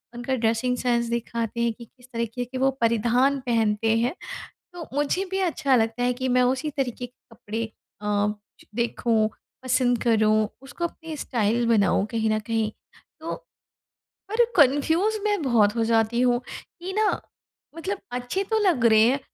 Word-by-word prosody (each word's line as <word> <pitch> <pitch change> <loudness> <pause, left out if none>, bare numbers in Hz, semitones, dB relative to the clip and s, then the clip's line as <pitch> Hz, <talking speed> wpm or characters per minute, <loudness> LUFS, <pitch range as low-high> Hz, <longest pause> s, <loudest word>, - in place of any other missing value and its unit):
उनका 240 +2 -2
dressing 230 +2 0
sense 240 -1 +1
दिखाते 235 0 -3
हैं 235 -1 +1
कि 235 +1 -12
किस 250 +2 -22
तरीके 235 +1 -2
के 255 +2 -7
वो 265 +1 +3
परिधान 240 +5 +2
पहनते 225 -1 +2
हैं 245 +8 0 0.6
तो 340 -3 -8
मुझे 295 +7 0
भी 385 - 0
अच्छा 280 -3 +1
लगता 225 +1 +1
है 250 0 +2
कि 260 +1 -3
मैं - - +5
उसी 300 +3 -3
तरीके 245 -2 -2
के 245 - -16 0.2
कपड़े 225 +3 -4 0.4
अ, 210 0 +1 0.5
देखूँ 230 -2 +1 0.3
पसंद 250 -1 +2
करूँ 215 -2 +3
उसको 270 +6 -4
अपनी 320 -2 -9
स्टाइल 235 -1 0
बनाऊँ 205 -3 +3
कहीं 225 -1 0
न 215 0 +1
कहीं। 220 0 -1 0.5
तो 325 - -4 1.0
पर 445 +3 +4
कन्फ्यूज़ 320 +9 +3
मैं 415 -4 +1
बहुत 225 -6 +3
हो 230 - +1
जाती 225 +1 +2
हूँ 245 -1 +3
कि 360 +2 -8
ना 425 +1 +3 0.7
मतलब 380 +5 -3
अच्छे 245 +10 -2
तो 440 +3 0
लग 350 - +2
रहे 220 -1 +6
हैं 275 +2 +1
245 Hz, 160 wpm, -25 LUFS, 225-275 Hz, 1.0 s, रहे